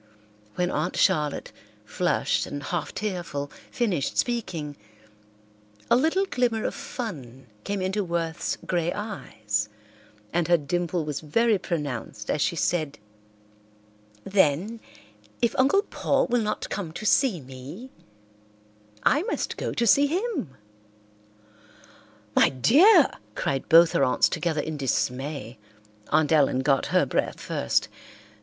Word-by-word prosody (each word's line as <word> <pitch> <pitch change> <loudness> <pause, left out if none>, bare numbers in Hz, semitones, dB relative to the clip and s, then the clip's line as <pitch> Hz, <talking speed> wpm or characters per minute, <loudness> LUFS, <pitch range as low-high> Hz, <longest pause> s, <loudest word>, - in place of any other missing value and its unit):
When 180 0 0
Aunt - - -2
Charlotte, 150 -6 +1 0.3
flushed - - 0
and 145 0 -6
half 165 +1 -3
tearful, 175 -8 -4 0.2
finished 195 - -1
speaking, 170 -12 -2 1.2
a - - +8
little 325 +9 +2
glimmer 245 - 0
of - - -1
fun 145 - -7 0.2
came 200 -2 -2
into 195 +2 0
Worth's 170 -2 -2
grey 175 -1 0
eyes, 110 - -3 0.6
and 175 -2 +1
her 175 0 +5
dimple 170 +2 -2
was 150 -2 -3
very 215 +7 +2
pronounced 140 - -4
as 150 - -1
she 170 - +1
said, 155 -3 -1 1.3
"Then, 195 +4 +1 0.6
if 235 -1 +1
Uncle 280 +10 +4
Paul - - 0
will 245 0 +1
not 215 -1 -3
come 185 -6 -3
to 215 - -7
see 225 -4 +3
me, 135 - -10 1.1
I 295 - +4
must 420 - -2
go - - -3
to 235 - 0
see 280 +6 +5
him." 355 - -2 1.8
"My - - +6
dear!" 295 - +6 0.3
cried 135 -1 -2
both 165 +1 +7
her - - +2
aunts 125 - +3
together 160 -3 -1
in 155 0 -5
dismay. 130 -2 -2 0.5
Aunt 155 0 +2
Ellen 140 -4 +3
got 135 0 +2
her - - +3
breath - - -1
first. 65 - 0
170 Hz, 125 wpm, -26 LUFS, 145-225 Hz, 1.8 s, a